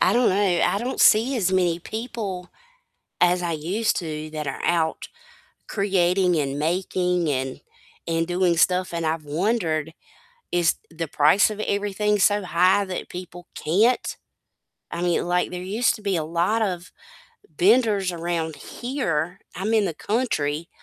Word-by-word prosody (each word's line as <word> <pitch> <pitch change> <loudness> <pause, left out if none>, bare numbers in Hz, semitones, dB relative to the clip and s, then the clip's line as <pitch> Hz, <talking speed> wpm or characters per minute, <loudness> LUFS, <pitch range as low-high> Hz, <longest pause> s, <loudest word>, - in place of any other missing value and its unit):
I - - +4
don't 245 0 +4
know, 190 - +1 0.3
I 200 - +1
don't 245 +4 -3
see 235 +5 +5
as 190 -4 +1
many 175 -2 +2
people 215 -4 -5 0.7
as 180 0 +4
I 170 -1 -1
used 180 +9 -1
to 155 -2 -5
that 155 -1 -5
are 135 - -5
out 165 -2 0 0.6
creating 185 -2 +2
and 140 -2 -1
making 180 +1 0
and 130 -2 -2 0.5
and 165 0 0
doing 175 0 +1
stuff, 180 +2 +2
and 170 -1 -2
I've 160 0 -1
wondered, 160 -1 -1 0.6
is 175 -1 +2
the 165 0 -5
price 155 +10 +4
of 215 -1 -6
everything 205 0 0
so 205 0 +3
high 185 +3 +3
that 185 -1 -5
people 175 -1 -9
can't? 215 +10 +1 0.8
I 170 - -4
mean, 175 0 +1
like, 180 0 +1
there 180 0 -5
used 210 +6 +1
to - - -12
be 200 -2 0
a 160 - 0
lot 175 +8 +1
of 180 -3 -4 0.7
vendors 205 -2 +3
around 165 -2 -3
here. 180 - -3 0.2
I'm 195 +5 -2
in 215 -2 +3
the 170 -5 -3
country, 170 - -1
180 Hz, 155 wpm, -24 LUFS, 165-205 Hz, 0.8 s, see